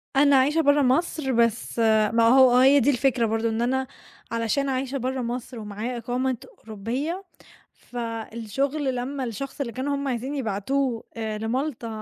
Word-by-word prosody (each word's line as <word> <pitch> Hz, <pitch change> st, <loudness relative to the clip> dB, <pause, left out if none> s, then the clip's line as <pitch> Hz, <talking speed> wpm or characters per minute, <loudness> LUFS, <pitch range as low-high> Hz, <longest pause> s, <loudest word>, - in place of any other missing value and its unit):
أنا 280 Hz, 0 st, +5 dB
عايشة 290 Hz, +5 st, +4 dB
بَرّه 285 Hz, -1 st, +4 dB
مصر 270 Hz, +1 st, +1 dB
بس 235 Hz, 0 st, +1 dB, 0.3 s
ما 230 Hz, -, +4 dB
هو 255 Hz, 0 st, +6 dB
هي 270 Hz, +3 st, +6 dB
دي 280 Hz, -, +3 dB
الفكرة 255 Hz, -3 st, +2 dB
برضه 225 Hz, +1 st, 0 dB
إن 225 Hz, +1 st, -2 dB
أنا 260 Hz, +2 st, 0 dB, 0.4 s
علشان 230 Hz, +5 st, 0 dB
عايشة 265 Hz, +1 st, -2 dB
بَرّه 260 Hz, 0 st, -2 dB
مصر 240 Hz, 0 st, -5 dB
ومعايا 215 Hz, +4 st, -5 dB
إقامة 250 Hz, +2 st, -1 dB, 0.2 s
أوروبية، 245 Hz, -, -4 dB, 0.5 s
فالشغل 240 Hz, +4 st, -3 dB
لمّا 265 Hz, +3 st, -3 dB
الشخص 255 Hz, +5 st, -5 dB
اللي 235 Hz, -4 st, -3 dB
كانوا 275 Hz, +4 st, -2 dB
هُم 280 Hz, 0 st, -3 dB
عايزين 260 Hz, +3 st, -3 dB
يبعتوه 240 Hz, +2 st, -1 dB
آآ 220 Hz, -1 st, -3 dB
لمالطا 240 Hz, +3 st, -2 dB
255 Hz, 150 wpm, -25 LUFS, 230-275 Hz, 0.5 s, هو